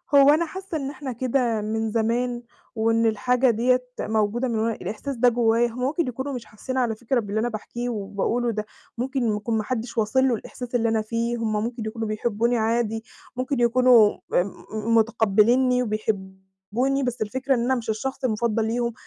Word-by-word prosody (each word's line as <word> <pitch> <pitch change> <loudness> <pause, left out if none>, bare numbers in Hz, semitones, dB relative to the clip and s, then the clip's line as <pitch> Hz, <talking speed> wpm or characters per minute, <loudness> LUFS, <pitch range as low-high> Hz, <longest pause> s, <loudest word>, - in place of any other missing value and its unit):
هو 280 0 +8
أنا 315 +3 +4
حاسة 375 0 -5
إن 275 -2 -3
إحنا 275 -1 -6
كده 240 -2 0
من 220 +1 -2
زمان، 240 +2 0 0.3
وإن 225 +1 +2
الحاجة 250 +4 +2
دِيَّة 250 +3 +2 0.2
موجودة 220 +3 0
من 230 -3 -1
وأن 225 +1 +1
الإحساس 220 +9 -5
ده 245 +1 +4
جوايا، 235 0 +2
هم 235 +1 -8
ممكن 300 +5 0
يكونوا 265 +3 -4
مش 245 -3 -6
حاسين 215 +5 -6
على 240 -4 +1
فكرة 240 +3 0
باللي 210 -1 -2
أنا 240 +2 0
باحكيه 240 +2 -5
وباقوله 220 +3 -1
ده. 215 -1 -3 0.3
ممكن 245 -3 0
يكون 220 +2 -1
ما 215 - -1
حدش 235 +1 -4
واصل 245 +5 +3
له 245 - +2
الإحساس 245 +2 -7
اللي 230 -1 +2
أنا 225 -1 +1
فيه. 230 +2 -2
هم 215 -2 -1
ممكن 235 0 -4
يكونوا 225 0 -3
بيحبوني 230 +2 0
عادي، 225 0 0 0.3
ممكن 255 +1 -2
يكونوا 240 -2 +6 0.2
آآ، 175 - +4 0.3
م 220 +1 0
متقبلينني 235 +3 +3
وبيحبوني، 205 +4 -2
بس 245 -2 -3
الفكرة 260 +5 0
إن - - -1
أنا 260 +2 +2
مش 235 -3 -5
الشخص 260 +6 -3
المفضّل 225 -2 +1
ليهم، 235 +1 -1
235 Hz, 185 wpm, -24 LUFS, 220-250 Hz, 0.3 s, هو